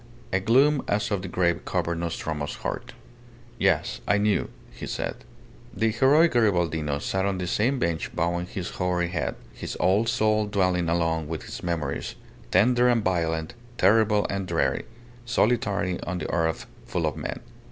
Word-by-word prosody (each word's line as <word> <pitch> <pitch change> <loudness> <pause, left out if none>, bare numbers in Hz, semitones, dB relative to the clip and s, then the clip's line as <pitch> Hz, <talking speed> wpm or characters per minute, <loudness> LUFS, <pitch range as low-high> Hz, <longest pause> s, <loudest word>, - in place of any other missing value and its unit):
A 95 - +3
gloom 135 +8 +4
as 105 +1 0
of 100 -2 0
the 95 - -5
grave 85 -1 +1
covered 85 -2 -1
Nostromo's 80 -3 -3
heart. - - -5 0.7
"Yes. - - +1
I 105 - +4
knew," 105 0 +1 0.2
he - - -8
said. - - -3 0.6
The 110 +3 +2
heroic 140 +8 +5
Garibaldino 85 -10 +1
sat 95 +5 -1
on 100 -1 0
the 90 - -3
same 115 +9 +1
bench 85 -9 -1
bowing 85 +1 0
his 90 -1 -5
hoary 90 -1 0
head, 85 - -2 0.2
his - - -6
old 100 +5 +3
soul 110 -2 +2
dwelling 90 -4 +1
alone 80 -2 0
with 80 0 -5
its - - -7
memories, 85 -3 -3 0.3
tender 120 +6 +4
and 120 -3 +3
violent, 80 -4 -1 0.2
terrible 105 +1 +4
and 95 -1 -3
dreary 85 -1 0 0.4
solitary 105 -6 +1
on 90 +1 -3
the 85 - -4
earth 80 -1 0 0.2
full - - -1
of - - -1
men. - - -4
95 Hz, 160 wpm, -26 LUFS, 85-110 Hz, 0.7 s, heroic